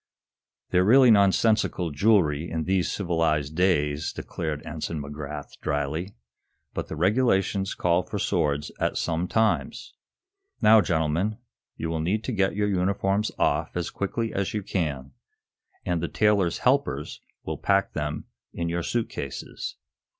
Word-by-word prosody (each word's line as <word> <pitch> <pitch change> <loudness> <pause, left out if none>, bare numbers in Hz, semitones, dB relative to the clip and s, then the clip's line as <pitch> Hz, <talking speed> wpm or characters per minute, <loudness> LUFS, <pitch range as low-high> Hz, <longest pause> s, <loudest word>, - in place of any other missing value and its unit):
"They're 90 - +4
really 125 +4 +7
nonsensical 100 -3 +3
jewelry 80 -2 +2
in 80 -1 -2
these 95 +1 +1
civilized 80 -6 0
days," 75 -5 +1
declared 80 -3 -5
Ensign 80 0 -4
McGrath, 75 0 -7
dryly. 75 +7 -2 0.6
"But - - -4
the - - -5
regulations 95 +1 +1
call 85 0 +2
for 105 +2 -6
swords 75 -7 0
at - - 0
some 85 +2 -1
times. 110 +2 0 0.7
Now, 110 0 +7
gentlemen, 85 +5 0 0.4
you 80 - -3
will 80 -1 -1
need 100 +7 0
to - - -3
get 100 -4 +1
your 105 0 +1
uniforms 100 +2 +1
off - - 0
as 90 - -2
quickly 115 +3 -2
as 100 +2 -2
you 105 - -2
can, 70 -9 -2 0.7
and 85 -2 0
the 85 - -1
tailor's 100 -5 +2
helpers 125 - 0 0.2
will - - -4
pack 100 -1 +1
them 75 0 -3 0.3
in 85 0 -2
your 85 +1 -1
suit 115 +6 -1
cases. 70 - -6
90 Hz, 140 wpm, -26 LUFS, 75-100 Hz, 0.7 s, really